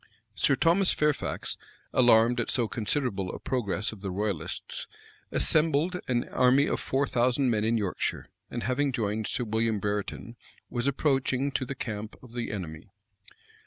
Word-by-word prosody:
Sir 140 - +3
Thomas 175 +6 +4
Fairfax, 150 -1 -1 0.4
alarmed 120 -1 +5
at 120 - -1
so 120 -3 +2
considerable 105 -4 -1
a - - -6
progress 110 -5 -1
of 110 -3 -11
the 100 - -3
royalists, 100 -2 -3 0.4
assembled 160 +3 +3
an 120 -2 0
army 130 +3 +4
of - - -1
four 135 +2 0
thousand 125 +1 +2
men 105 -2 +1
in 115 +1 +2
Yorkshire, 100 -4 -2 0.2
and 120 - -4
having 135 +2 +1
joined 110 -3 -1
Sir - - -1
William 110 0 0
Brereton, 105 +3 -3 0.3
was 120 +1 -1
approaching 135 -1 +1
to 130 - -1
the 140 - -5
camp 110 -2 -5
of 120 -2 -14
the 120 -1 -3
enemy. 90 -2 -6
120 Hz, 155 wpm, -28 LUFS, 105-135 Hz, 0.4 s, alarmed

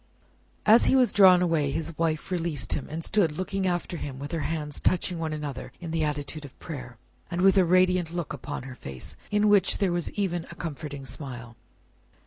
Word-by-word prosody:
As 220 +3 +7
he - - +4
was 250 -5 +4
drawn 185 -3 +7
away, 160 -5 +1
his 165 +3 -3
wife 160 +1 -1
released 165 -7 -1
him, 140 - -3
and 160 +2 -4
stood 175 -8 +2
looking 190 +1 -1
after 175 0 -2
him 140 -4 -6
with 145 +1 -6
her 165 - -1
hands 150 -1 -2
touching 180 -1 +1
one 160 -1 -2
another 150 -4 -5
in 170 -2 -6
the 165 -1 0
attitude 150 0 -3
of 140 - -12
prayer, 125 -6 -8 0.3
and 175 0 -2
with 195 +1 +6
a 190 -2 +5
radiant 180 -1 +3
look 170 -4 -4
upon 145 -1 -6
her 130 0 -8
face, 65 - -8
in 210 0 +2
which 205 -2 +4
there 195 -3 +1
was 175 -1 0
even 175 -5 -2
a 170 - -9
comforting 145 -4 -6
smile. 125 -4 -7
165 Hz, 200 wpm, -27 LUFS, 145-180 Hz, 0.3 s, As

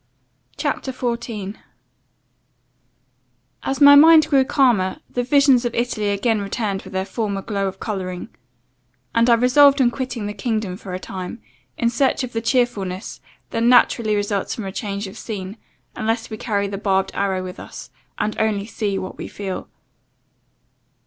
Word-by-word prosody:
CHAPTER 285 -2 -2
14 235 -5 -4 2.0
"AS 270 0 -2
MY 285 -1 +9
MIND 310 +1 +8
grew 275 -3 +5
calmer, 245 -9 +2
the 245 - -1
visions 270 0 +4
of 240 -1 -2
Italy 230 -3 -1
again 205 +2 +1
returned 200 -1 -2
with 190 - -12
their 190 0 -1
former 200 -1 -3
glow 200 -2 -2
of 190 - -6
colouring; 185 -4 -4 0.8
and 230 +1 +3
I 235 - +7
resolved 275 +4 +5
on 245 -2 +4
quitting 250 -4 -4
the 205 - -4
kingdom 215 -6 -2
for 185 -2 -7
a - - -4
time, 185 -1 -7 0.4
in 235 0 +1
search 265 +2 +1
of 250 - -6
the 225 - -1
cheerfulness, 225 -6 -1 0.3
that 230 - -1
naturally 235 -2 +4
results 205 -1 -1
from 220 - -6
a 190 - -4
change 200 0 -4
of 195 +3 -9
scene, 200 -3 -6 0.4
unless 225 +1 -2
we - - -3
carry 205 -3 -1
the 195 -1 -5
barbed 195 -2 +1
arrow 190 -2 -1
with 185 +1 -8
us, - - -10 0.3
and 215 - -1
only 210 -2 0
see 210 -3 -2
what 185 - -6
we - - -5
feel. 195 -2 -6
215 Hz, 160 wpm, -21 LUFS, 195-245 Hz, 2.0 s, MY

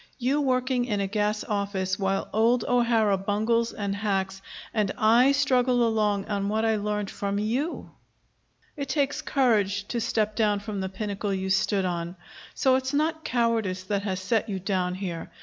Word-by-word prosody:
You 270 +4 +1
working 255 -2 +1
in 210 -4 -1
a 200 - 0
gas 210 +1 -1
office, 200 -2 -2
while 195 0 0
old 230 +2 +3
O'Hara 230 -5 +3
bungles 220 +4 +1
and 200 -2 -3
hacks, 195 -2 -2 0.3
and 210 -3 +1
I 235 +5 +5
struggle 255 -3 +3
along 210 -3 +1
on 200 -2 -2
what 220 +1 0
I 220 -1 +2
learned 210 -1 -2
from 200 0 -2
you! 240 +10 -2 0.8
It 280 -2 -5
takes 285 -2 0
courage 205 -7 +1
to 235 - -1
step 215 -1 0
down 210 -3 +2
from 205 -1 -5
the 190 - -3
pinnacle 200 +1 -3
you 190 0 -2
stood 190 0 +2
on. 175 0 -3 0.4
So 260 -1 +3
it's 265 +2 -2
not 315 +2 0
cowardice 230 -8 0
that 200 +1 -1
has 190 -2 -2
set 220 +3 0
you 195 - -2
down 180 -1 -1
here. 180 -4 -5
210 Hz, 170 wpm, -26 LUFS, 195-240 Hz, 0.8 s, I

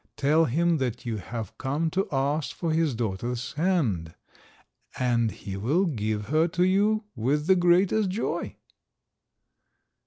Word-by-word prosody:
Tell 155 +3 +3
him 165 +5 +2
that 125 -3 -3
you 115 -2 -2
have 110 +1 -6
come 150 +4 -1
to 190 +3 0
ask 140 +2 -1
for 165 -2 -2
his 155 -5 +1
daughter's 120 +3 -3
hand, 140 - 0 0.8
and 120 -2 +1
he 100 -2 -7
will 140 - +1
give 110 - -2
her 155 +3 +3
to 175 +1 0
you 205 +4 +2
with 140 +6 0
the 190 +2 +5
greatest 185 +3 +3
joy." 200 +5 -3
145 Hz, 135 wpm, -26 LUFS, 115-175 Hz, 0.8 s, the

